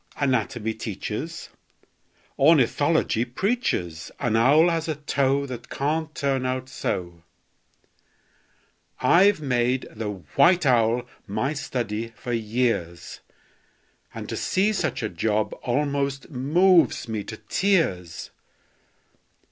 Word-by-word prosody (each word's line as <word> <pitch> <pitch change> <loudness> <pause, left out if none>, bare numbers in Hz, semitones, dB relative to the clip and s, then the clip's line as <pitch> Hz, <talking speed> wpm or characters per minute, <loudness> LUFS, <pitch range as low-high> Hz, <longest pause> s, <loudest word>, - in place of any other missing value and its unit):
Anatomy 120 -4 0
teaches, 110 - -5 0.9
Ornithology 145 -3 +3
preaches 125 - -2
An 115 -3 0
owl 140 +9 +5
has 165 -1 -1
a 155 - -1
toe 140 -1 0
That 125 -3 -8
can't 155 +2 -2
turn 135 -2 0
out 130 0 -2
so! 85 -8 -4 1.8
I've 190 0 +4
made 125 -2 0
the 110 -1 -4 0.3
white 175 -1 +5
owl 120 -1 +3 0.2
my 130 +8 -1
study 115 -5 -4
for 120 +1 -5
years, 110 -6 -2 0.9
And - - -7
to - - -4
see 200 +3 +1
such 195 - -2
a - - 0
job 105 +4 -1
almost 140 +2 -1
moves 155 +2 +3
me 110 -2 -3
to 110 - -7
tears! 105 - -1
130 Hz, 105 wpm, -24 LUFS, 110-150 Hz, 1.8 s, owl